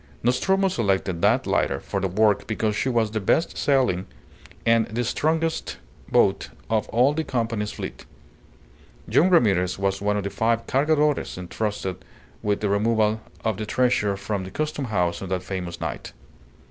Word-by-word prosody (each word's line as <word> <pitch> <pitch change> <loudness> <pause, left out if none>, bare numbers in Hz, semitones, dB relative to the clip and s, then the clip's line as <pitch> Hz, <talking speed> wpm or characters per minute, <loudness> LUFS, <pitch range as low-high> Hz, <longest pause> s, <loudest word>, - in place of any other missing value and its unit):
Nostromo 190 - +2
selected 95 - 0
that - - +3
lighter - - +1
for 100 - -3
the 95 - 0
work 105 +2 +2
because 110 -1 -1
she 130 - 0
was 115 -4 +1
the 110 - -1
best 135 - +1
sailing 125 -10 +1 0.6
and 115 -1 +4
the 120 +3 -2
strongest 160 +6 -1 0.3
boat - - +3 0.2
of 110 -2 +1
all 125 +5 +3
the 160 +1 -1
Company's 115 -6 -2
fleet. - - -7 1.0
Young 180 - +4
Ramirez 95 - +3
was 95 0 -1
one 105 0 +1
of 100 - -2
the 100 - -3
five 115 +1 0
Cargadores 150 -1 +1
entrusted 95 0 -4 0.4
with 105 -1 0
the 105 - 0
removal 110 +1 +2 0.2
of 110 -3 0
the 110 - -3
treasure 110 -5 +1
from 100 -1 -3
the 95 - -7
Custom 150 +4 -3
House 90 -6 0
on 95 - -5
that 95 -1 -2
famous 90 -3 -5
night. - - -5
110 Hz, 160 wpm, -24 LUFS, 100-125 Hz, 1.0 s, and